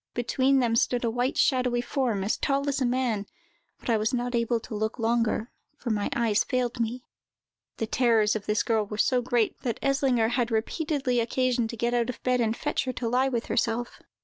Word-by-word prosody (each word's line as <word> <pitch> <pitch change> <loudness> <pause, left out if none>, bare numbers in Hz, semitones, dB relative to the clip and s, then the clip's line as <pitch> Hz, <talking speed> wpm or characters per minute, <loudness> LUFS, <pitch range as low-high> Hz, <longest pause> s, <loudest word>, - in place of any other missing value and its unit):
Between 260 +3 +2
them 230 -2 +1
stood 245 +1 +1
a 230 - +1
white, 245 +3 -1
shadowy 250 -2 +2
form, 240 -5 -1
as 205 - 0
tall 280 +1 0
as 280 -1 0
a 255 - +2
man, 240 -5 -1 0.5
but - - -12
I 230 -2 +3
was 215 +4 0
not 245 0 -2
able 235 0 +1
to - - -9
look 215 +2 -2
longer, 230 0 0 0.3
for 240 - -3
my 205 -1 0
eyes 225 -3 +2
failed 250 -1 -1
me." 235 +2 -2 0.7
The 225 - -1
terrors 220 -2 +2
of 215 - -5
this 210 +1 +1
girl 225 -2 +1
were 210 - -6
so 250 +3 +2
great, 240 -3 0
that 235 -4 -3
Eslinger 270 -5 +2
had 240 -1 0
repeatedly 255 +2 0
occasion 245 0 +1
to 230 +1 -7
get 235 +2 0
out 240 0 +1
of 250 - -6
bed 250 -1 +2
and 225 0 0
fetch 295 -2 -1
her 255 - -2
to 245 -1 -3
lie 255 +3 +2
with 240 -3 -2
herself. 235 +1 -1
240 Hz, 210 wpm, -27 LUFS, 225-255 Hz, 0.7 s, I